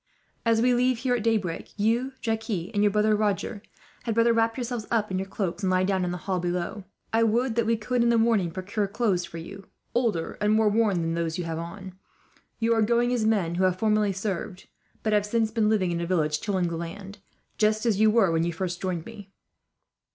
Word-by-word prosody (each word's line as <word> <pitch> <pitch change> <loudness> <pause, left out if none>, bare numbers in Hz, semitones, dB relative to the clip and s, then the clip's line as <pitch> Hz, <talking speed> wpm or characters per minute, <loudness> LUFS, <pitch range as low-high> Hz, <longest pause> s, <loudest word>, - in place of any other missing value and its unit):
"As 225 0 +3
we 250 0 +4
leave 250 0 +2
here 250 +1 0
at 245 - 0
daybreak, 210 -7 -1
you, 235 +6 +1
Jacques, 225 -1 -2
and 205 +1 -1
your 205 - +5
brother 210 +1 +2
Roger 205 0 -1 0.4
had 225 -2 -2
better 230 0 +4
wrap 225 +1 +1
yourselves 240 -3 -4
up 215 -4 0
in 185 - 0
your 190 - -4
cloaks, 190 -2 -3
and 190 - 0
lie 185 0 +2
down 190 -1 +1
in 180 - -1
the 180 - -3
hall 190 -2 0
below. 180 +3 -3 0.3
I 225 - +3
would 230 +2 +2
that 230 -1 0
we 230 0 +2
could, 240 +3 -1
in 235 - +3
the 235 - +4
morning, 225 -6 +2
procure 200 +4 -3
clothes 200 -4 0
for 165 - -9
you, 195 +4 -9 0.3
older 225 -9 -1
and 210 +1 +3
more 220 -1 +4
worn 210 -4 +2
than 165 0 -1
those 165 0 -2
you 180 - -2
have 165 -1 -4
on. 185 +3 -8 0.6
You 230 0 +2
are 225 - +2
going 235 +3 +2
as 230 -3 0
men 195 -7 +1
who 180 +2 0
have 185 -1 +1
formerly 215 -1 +2
served; 190 -1 -4 0.4
but 215 - +1
have 210 -1 +3
since 220 +1 0
been 220 -1 +2
living 195 -5 +1
in 170 0 -2
a 170 - -3
village, 155 -4 +1
tilling 190 -2 0
the 165 - -4
land, 195 +4 -7 0.4
just 215 +1 +2
as 215 -4 +2
you 220 0 +6
were 215 -5 +4
when 165 0 +1
you 170 - 0
first 175 +1 -4
joined 180 -4 -2
me." 205 -2 -11
210 Hz, 230 wpm, -26 LUFS, 185-225 Hz, 0.6 s, you